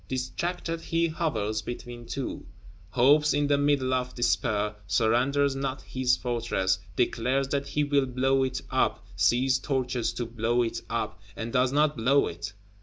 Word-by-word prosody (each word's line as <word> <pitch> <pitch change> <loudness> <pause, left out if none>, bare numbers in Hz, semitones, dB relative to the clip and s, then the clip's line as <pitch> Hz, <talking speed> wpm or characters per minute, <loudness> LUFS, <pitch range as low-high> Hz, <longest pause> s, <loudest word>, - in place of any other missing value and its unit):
Distracted, 165 +6 -3
he 165 0 0
hovers 110 - -1
between 120 +1 -7
two; 135 -7 -5 0.4
hopes 145 +6 +4
in 145 0 +2
the 145 0 +3
middle 140 -3 +2
of 125 0 -1
despair; 110 -4 +1
surrenders 130 +7 +2
not 135 0 -3
his 130 -1 +1
Fortress; 115 -6 0 0.2
declares 130 +4 +1
that 140 0 -1
he 150 - 0
will 145 -2 +2
blow 135 +2 +2
it 130 0 -1
up, 130 -8 +1
seizes 120 +9 +3
torches 130 -4 -1
to 120 - -3
blow 115 +1 0
it 115 - -3
up, 110 -3 -3
and 115 +1 -5
does 125 0 +3
not 150 +1 +2
blow 135 +5 +3
it. 85 +4 -5
130 Hz, 155 wpm, -27 LUFS, 115-140 Hz, 0.4 s, hopes